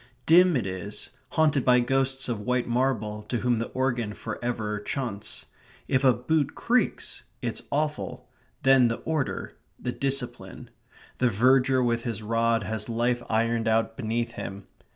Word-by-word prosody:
Dim 175 +1 +6
it 115 - -2
is, 95 +2 -5 0.2
haunted 150 -4 +3
by 125 -1 +5
ghosts 135 +2 +1
of 120 -4 -2
white 125 +3 0
marble, 120 -4 0
to 120 - 0
whom 120 -2 +2
the 115 - -2
organ 120 -5 -1
for - - -6
ever 110 -3 -2
chaunts. 105 -2 -4 0.4
If 130 - +1
a 130 - +7
boot 140 +5 0
creaks, 250 +2 0 0.2
it's - - -2
awful; 150 +1 -2 0.4
then 135 -2 +6
the 115 - -1
order; 155 -4 -2 0.2
the 125 - -2
discipline. 135 -1 -4 0.5
The 125 - +4
verger 130 +4 +4
with 120 -1 +1
his 115 -3 -4
rod 115 +1 +1
has 110 +1 -3
life 120 +1 +1
ironed 115 +1 +1
out 110 0 +2
beneath 115 0 -2
him. 100 -4 -7
120 Hz, 150 wpm, -27 LUFS, 115-135 Hz, 0.5 s, a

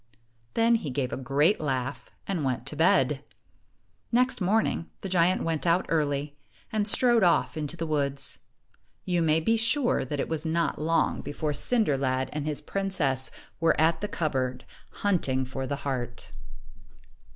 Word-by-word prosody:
Then 230 +1 +4
he 160 - -5
gave 130 -1 -2
a - - 0
great 140 +9 +2
laugh 130 -3 -3 0.2
and 180 -6 -2
went 125 -3 -1
to 150 - -4
bed. 145 -3 +3 0.9
Next 250 -1 +2
morning, 190 -3 +1
the 195 - -5
giant 180 0 +2
went 165 0 -1
out 170 +2 +3
early, 145 -2 0 0.4
and 210 -1 0
strode 240 +1 +4
off 175 -2 +3
into 155 +1 -3
the 165 - -2
woods. 140 -3 0 0.7
You 175 -2 +1
may 160 -1 +3
be 225 +8 +2
sure 235 +4 +2
that 145 +2 -4
it - - -1
was 160 -2 -3
not 165 -1 -1
long 165 +2 +1
before 150 +1 -3
Cinder 215 - +2
lad 130 -1 -1
and 150 0 -3
his 150 -2 -1
princess 165 -10 +1 0.3
were 165 -1 +2
at 160 +1 +3
the 210 - -1
cupboard, 130 -8 -2 0.4
hunting 135 -10 +1
for 130 +1 -5
the 140 - -2
ii3 - - -10
heart. 125 -3 -4
155 Hz, 165 wpm, -27 LUFS, 135-180 Hz, 0.9 s, Then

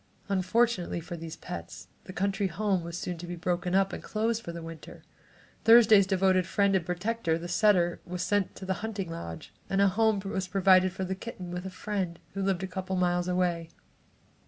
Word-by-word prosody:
Unfortunately 195 0 +1
for 175 +1 -7
these 165 -1 -7
pets, 180 - -8 0.2
the - - -8
country 195 +2 0
home 190 0 0
was 170 0 -5
soon 175 -1 -4
to 175 - -7
be 175 - -4
broken 175 +1 -1
up 195 0 +2
and - - -5
closed 225 +1 -1
for 170 - -6
the 170 0 -7
winter. 165 -1 -10 0.6
Thursday's 220 -4 +7
devoted 190 -2 +2
friend 200 -1 +2
and 185 - +2
protector, 180 -1 -1
the 170 +1 -6
setter, 175 -1 +3
was 180 0 -4
sent 205 0 0
to 190 - -8
the 190 - 0
hunting 200 -5 -4
lodge, 85 - -7 0.2
and 195 0 +1
a 200 0 +5
home 220 +1 +2
was 190 -1 -2
provided 185 -1 +4
for 190 +1 -4
the 190 - -2
kitten 190 -3 -7
with 180 +1 -4
a - - -4
friend 185 -2 -3 0.2
who 195 - -3
lived 190 -1 0
only 190 - -5
a - - -14
couple 190 0 -3
of - - 0
miles 175 0 +1
away. 175 -2 0
185 Hz, 205 wpm, -29 LUFS, 175-200 Hz, 0.6 s, Thursday's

